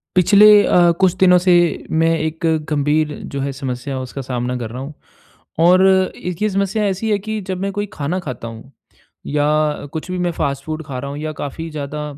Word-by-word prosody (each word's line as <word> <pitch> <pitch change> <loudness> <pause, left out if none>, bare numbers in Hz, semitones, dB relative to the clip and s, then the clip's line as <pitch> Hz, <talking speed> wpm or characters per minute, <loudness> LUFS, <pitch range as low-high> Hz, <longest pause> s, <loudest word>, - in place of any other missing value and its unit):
पिछले 200 +3 +6 0.2
अ, 175 -1 +5
कुछ 185 -2 +4
दिनों 180 -1 +5
से 180 0 +2 0.4
मैं 160 +1 +2
एक 160 +2 -4 0.2
गंभीर 150 +1 +1 0.2
जो 140 - -3
है 140 - -2
समस्या, 130 0 -5
उसका 130 +2 -6
सामना 125 -1 -3
कर 115 -3 -5
रहा 125 +2 -7
हूँ। 145 +3 -8 0.7
और 180 +3 +5 0.3
इसकी 180 +4 -3
समस्या 200 +2 -1
ऐसी 195 +3 -2
है 205 - +3
कि 220 +2 -4
जब 185 - -2
मैं 200 0 -1
कोई 205 +1 -3
खाना 160 +5 -2
खाता 130 -8 -6
हूँ, 115 +4 -11 0.5
या 150 0 0
कुछ 160 +3 -5
भी 185 - -2
मैं 175 -1 0
फ़ास्ट 140 -4 -3
फ़ूड 155 0 -4
खा 130 -4 -5
रहा 140 +2 -6
हूँ 145 - -6
या 155 0 -4
काफ़ी 160 +3 -5
ज़्यादा 150 0 -5
155 Hz, 195 wpm, -19 LUFS, 140-180 Hz, 0.7 s, पिछले